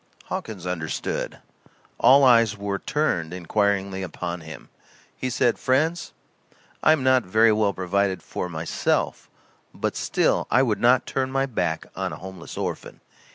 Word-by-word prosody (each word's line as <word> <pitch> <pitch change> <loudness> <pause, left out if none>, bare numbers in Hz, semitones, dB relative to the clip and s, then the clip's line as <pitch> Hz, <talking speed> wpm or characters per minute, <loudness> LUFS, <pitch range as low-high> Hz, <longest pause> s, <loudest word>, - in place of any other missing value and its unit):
Hawkins 100 -6 -5
understood. 85 -3 -3 0.6
All 140 +2 +6
eyes 115 -5 +5
were 100 -1 -3
turned 90 - -1
inquiringly 95 +1 0
upon 90 -1 -5
him. 80 0 -11 0.5
He 130 - -3
said: 120 -1 +1
"Friends, 155 +7 0 0.7
I - - +5
am 155 -4 +2
not 130 -1 +4
very 110 +3 +4
well 105 -1 +2
provided 95 0 -1
for, 90 - -4
myself, 80 -1 -1 0.5
but - - -2
still - - +1
I 130 - +4
would 110 -5 0
not 125 +2 +4
turn 130 -1 -2
my 135 0 +1
back 80 -11 -2
on - - -3
a - - -7
homeless 95 -2 -9
orphan. - - -5
100 Hz, 145 wpm, -24 LUFS, 90-130 Hz, 0.7 s, All